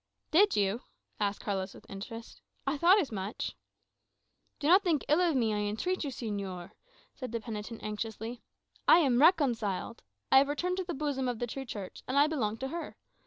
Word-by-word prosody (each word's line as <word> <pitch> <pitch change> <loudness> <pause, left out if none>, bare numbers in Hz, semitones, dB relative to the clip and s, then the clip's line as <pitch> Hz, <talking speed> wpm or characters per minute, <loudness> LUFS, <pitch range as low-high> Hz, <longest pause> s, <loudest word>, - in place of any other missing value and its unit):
"Did 395 +6 +5
you?" 205 +3 +1 0.4
asked 205 -1 -1
Carlos 195 -2 -3
with - - -15
interest. 225 +4 -8 0.2
"I 275 +2 +1
thought 350 +7 +6
as 310 -11 -1
much." 200 0 -4 1.0
"Do 285 - -6
not 370 +5 +7
think 330 -7 +1
ill 305 +4 +4
of 340 -4 +2
me, 225 -4 +2
I - - 0
entreat 215 - -1
of - - -3
you, - - -2
señor," 200 -7 -5 0.4
said 255 -5 -7
the 230 - -2
penitent 220 0 -6
anxiously. 220 +2 -4 0.5
"I - - +9
am 265 -7 +3
reconciled. 240 - +2 0.3
I 265 - +9
have 275 - +3
returned 360 +5 -1
to 375 - -1
the 350 -1 -4
bosom 275 -2 -1
of 245 -2 -1
the 240 - -1
true 270 +3 -6
Church, 205 -6 -7
and 260 - -1
I 285 - +7
belong 235 -9 -1
to 265 +3 -4
her. 335 +3 -6
245 Hz, 195 wpm, -31 LUFS, 210-300 Hz, 1.0 s, I